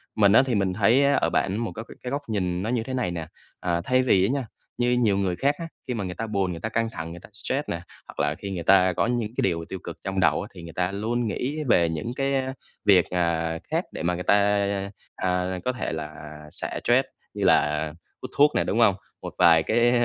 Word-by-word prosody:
Mình 100 -2 +5
á 130 - +7
thì 125 -4 0
mình 95 -2 +1
thấy 110 +7 +4
á 140 - +4
ở - - +2
bạn 100 +2 0
một 115 -1 -2
các 110 - -6
cái - - -12
cái 125 - -4
góc 140 +1 -1
nhìn 90 -4 -1
nó 110 - -2
như 120 -2 0
thế 130 - -6
này 125 -9 -1
nè. 80 -2 -5 0.3
À, 85 -1 -1
thay 130 +3 +2
vì 95 -6 +4
á - - 0
nha, 135 -5 -2 0.3
như 120 0 +2
nhiều 100 -3 +3
người 95 -3 0
khác 140 +7 +1
á, 165 - -4 0.2
khi 125 - -1
mà 105 -4 -3
người 90 -1 -5
ta 115 +3 -4
buồn, 100 -3 0
người 85 - -6
ta 110 - -3
căng 115 0 0
thẳng, 80 -6 -6
người 85 - -8
ta - - -15
stress 140 +6 -3
nè, 85 - -3 0.3
hoặc - - -11
là 75 - +1
khi 100 +1 -7
người 85 -3 -4
ta 95 0 +5
có 115 - +1
những 120 -3 -1
cái - - +2
điều 85 -3 0
tiêu 95 - -5
cực - - -7
trong 95 -1 -1
đầu 90 - +3
á, - - -6
thì 85 - -10
người 85 -1 -9
ta 90 +1 0
luôn 115 +4 -1
nghĩ 130 +9 -2
về 85 -5 +4
những 80 +9 -3
cái, 135 0 0
ơ, 130 0 -1 0.3
việc, 95 -4 +6
ờ, 85 -2 0
khác - - +1
để - - -6
mà 90 +1 +1
người 90 - -4
ta, - - +4 0.8
à, 90 0 -1
có 125 - +2
thể 125 - -3
là 75 0 -5 0.4
xả - - -4
stress - - +4 0.3
như - - -3
là 75 +1 +3 0.3
hút - - -7
thuốc 145 +1 +6
nè, - - +3
đúng 115 - -1
hông? 100 -5 +5 0.3
Một - - -7
vài 80 -1 +6
cái 120 +2 +3
100 Hz, 265 wpm, -25 LUFS, 90-120 Hz, 0.8 s, á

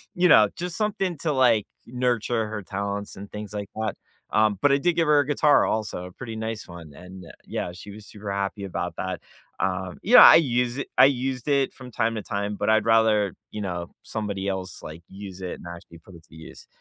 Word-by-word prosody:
you 180 +1 +4
know, 110 -7 +7
just 175 -1 -5
something 195 -5 -1
to, 155 -1 -1
like, 120 -6 +3 0.2
nurture 120 -2 -1
her 105 -1 -6
talents 100 +2 -4
and 100 +1 -10
things 105 -1 -7
like 100 -1 -5
that. 110 -1 -2 0.4
Um, 110 -2 +2
but 145 - +4
I - - +4
did 170 +4 +1
give 165 -2 +1
her 150 -1 +5
a 145 - +1
guitar 145 0 +4
also; 105 -4 -2
a - - -12
pretty 115 +4 -8
nice 110 -1 -5
one. 85 -3 -11
And 90 +4 -12 0.2
yeah, 85 - -4
she 100 +3 -11
was 105 +1 -12
super 105 -1 -8
happy 100 +1 -3
about 90 -2 -4
that. 95 -2 -4 0.4
Um, 95 -1 -2
yeah. 245 +5 +8
I - - +11
use 125 -4 +1
i - - -1
I - - +9
used 130 -1 -1
it 140 -2 +1
from 125 -2 -12
time 115 -1 0
to 110 - -3
time, 100 0 -3
but - - 0
I'd 110 0 +4
rather, 110 -3 +3 0.2
you 105 - -5
know, 85 -3 -4
somebody 100 -3 -3
else, 95 -3 -5
like, 80 +2 -9
use 95 -1 -10
it 90 - -4
and - - -13
actually 85 -1 -13
put 90 +2 -16
it 80 -1 -16
to - - -18
use. 80 0 -12
105 Hz, 220 wpm, -25 LUFS, 95-125 Hz, 0.4 s, I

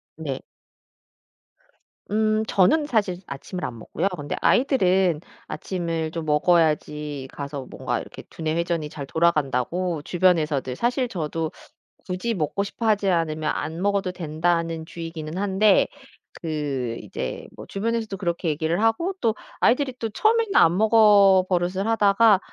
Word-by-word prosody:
네. - - -4 1.7
음 215 0 +2
저는 260 - +3
사실 205 -8 0
아침을 160 +6 -6
안 120 - -6
먹고요. 160 - -2
근데 145 -1 -4
아이들은 190 - +3 0.3
아침을 165 -3 -3
좀 165 -1 -5
먹어야지 150 -3 +1
가서 140 -2 -6
뭔가 - - -3
이렇게 - - -10
두뇌 160 -1 -2
회전이 170 -3 -1
잘 145 -2 -7
돌아간다고 160 +2 0
주변에서들 155 -6 +1
사실 245 - 0
저도 160 -4 -3 0.6
굳이 185 +6 -2
먹고 175 +1 -1
싶어 225 +3 -4
하지 205 -2 +2
않으면 155 -3 0
안 160 +3 -4
먹어도 200 -2 +1
된다는 165 -1 -1
주의기는 165 -1 -6
한데 200 +1 +3 0.5
그 140 -7 -3
이제 - - -6
뭐 - - -10
주변에서도 220 0 -2
그렇게 170 -2 -2
얘기를 160 +5 0
하고 225 +12 +1
또 225 -1 +2 0.2
아이들이 260 +1 +2
또 225 - -2
처음에는 435 - +1
안 170 +2 +5
먹어 205 -3 +6
버릇을 180 +3 0
하다가 210 -1 +4
175 Hz, 305 characters per minute, -24 LUFS, 155-205 Hz, 1.7 s, 먹어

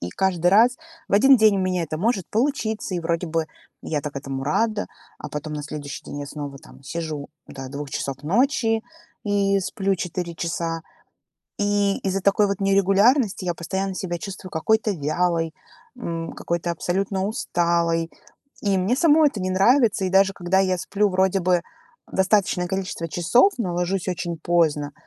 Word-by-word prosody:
И 90 - -4
каждый 180 - +1
раз 230 +7 +5 0.3
в - - -8
один 270 +6 +7
день 215 -3 +5
у - - 0
меня 185 -1 0
это 155 -1 -4
может 200 -1 0
получиться, 220 -5 -1
и 175 - -1
вроде 170 +1 -1
бы 165 -1 -1 0.4
я 150 - -2
так 145 -1 -6
этому 135 -1 -4
рада, 215 +8 0 0.3
а - - -7
потом 150 +1 -5
на 150 - -4
следующий 145 -1 -7
день 145 - -6
я 145 - -5
снова 140 -1 -7
там 145 -2 -16
сижу 155 0 -5 0.2
до 135 -1 -8
2 140 +2 -6
часов 135 +1 -4
ночи 225 - +2 0.4
и 200 -1 +2
сплю 195 +1 -1
4 175 -1 -4
часа. 165 0 -3 0.8
И 205 -1 +1
из-за 195 0 -1
такой 200 +2 +3
вот 200 -1 -2
нерегулярности 200 +3 +3
я 175 - 0
постоянно 190 +3 -3
себя 175 -2 -3
чувствую 185 0 -8
какой-то 220 +7 +1
вялой, 165 +1 0 0.4
м, 165 -8 -4
какой-то 170 0 -3
абсолютно 190 +3 -1
усталой, 170 -5 0 0.5
и 200 -2 +1
мне 190 +6 +1
самой 310 +1 +5
это 210 - -6
не 185 0 -1
нравится. 215 +2 +3
И 185 - -1
даже 195 +1 +4
когда 180 +2 +1
я 185 -1 +1
сплю 205 +4 +1
вроде 190 0 +2
бы 180 -1 +2 0.5
достаточное 190 -2 +2
количество 190 -3 -3
часов, 240 - +3
но 185 -7 -2
ложусь 180 +1 -1
очень 175 -1 -3
поздно, 155 -3 +1
185 Hz, 170 wpm, -23 LUFS, 165-200 Hz, 0.8 s, один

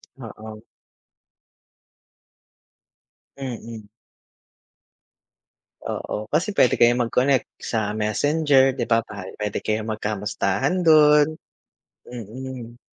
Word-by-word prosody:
Oo. 110 -3 -10 2.7
Mm. 115 -5 -7 2.0
Oo 105 - -4
kasi 170 +7 +1
pwede 125 - +5
kayong 120 0 +3
mag-connect 130 +2 +1 0.2
sa 110 -2 -2
Messenger, 135 +5 +2
'di 125 -3 -3
ba, 115 -1 +2 0.3
pwede 105 -1 -3
kayong 110 +1 -2
magkamustahan 105 - -1
dun, 155 -1 +5 0.7
mm. 120 +1 -8
120 Hz, 75 wpm, -23 LUFS, 110-135 Hz, 2.7 s, pwede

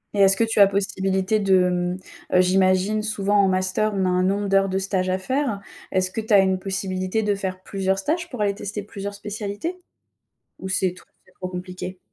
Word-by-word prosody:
Et - - -1
est-ce 195 0 +6
que - - +3
tu 225 -1 0
as 200 - +9
possibilité 195 +1 0
de, 190 -3 +3
mmh, 180 0 -1 0.4
heu, 180 - +7
j'imagine, 185 +3 +2
souvent 205 -1 0
en - - +4
master, 185 +3 +1
on 190 -1 +1
a - - +2
un 180 0 +2
nombre 200 +2 0
d'heures 195 0 +3
de 190 - -1
stage 190 -1 -1
à 185 - +1
faire. 255 +2 -1 0.3
Est-ce 185 -1 +1
que 225 - -3
tu 220 +1 -8
as 200 - +8
une 190 -1 +2
possibilité 190 +2 -2
de 210 -1 +1
faire 190 -2 -4
plusieurs 190 -1 -1
stages, 335 - -2
pour 250 -7 -6
aller 200 -1 +2
tester 205 +1 -5
plusieurs 200 -1 -6
spécialités? 205 - -5 0.9
Ou 190 - -5
c'est 190 -1 +1
tro - - -17 0.2
c'est 185 - -23
trop 185 - -6
compliqué? 185 0 -7
195 Hz, 215 wpm, -23 LUFS, 185-205 Hz, 0.9 s, as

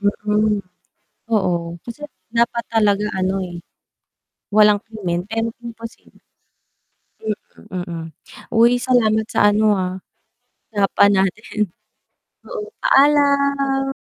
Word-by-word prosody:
Hmm. 210 +1 +1 0.7
Oo, 170 -5 0
kasi 295 +6 -8 0.2
nga 235 +1 +4
dapat 235 0 -5
talaga 210 -2 +2
ano 190 +1 0
eh, 175 -1 -6 0.9
walang 210 -1 +5
krimen, 195 -7 -3
pero 225 0 -1
imposible 230 0 -10 1.0
hmm, 205 -3 -6
mm, 170 -2 -6 0.5
uy, 235 +2 +5
salamat 220 -4 +2
sa 205 -2 +4
ano, 215 0 +3
ah, 185 -1 -2 0.8
usapan 200 0 +4
natin. 195 +3 -4 0.9
Oo, 445 -4 -5 0.2
paalam. 280 -1 +3
215 Hz, 100 wpm, -20 LUFS, 200-235 Hz, 1.0 s, walang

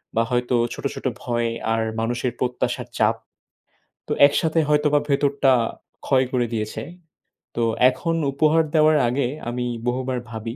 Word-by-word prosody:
বা, 115 - +3
হয়তো 125 0 +1 0.2
ছোট, - - -9
ছোট - - -9 0.2
ভয় 120 -1 -1 0.3
আর 115 - 0 0.2
মানুষের 120 +2 -1
প্রত্যাশার 125 -1 -2
চাপ। - - +3 0.9
তো - - -1
একসাথে 160 +3 +1
হয়তোবা 150 0 +3
ভেতরটা 140 -1 +2 0.5
ক্ষয় 130 -1 +3
করে 125 -2 +1
দিয়েছে। 110 -1 -3 0.7
তো 120 - 0 0.3
এখন 165 +6 -2 0.2
উপহার 155 +3 +3
দেওয়ার 155 0 +5
আগে 125 +1 0 0.2
আমি 125 +1 -3 0.2
বহুবার 130 +1 -1
ভাবি 115 0 -6
130 Hz, 135 wpm, -22 LUFS, 120-145 Hz, 0.9 s, দেওয়ার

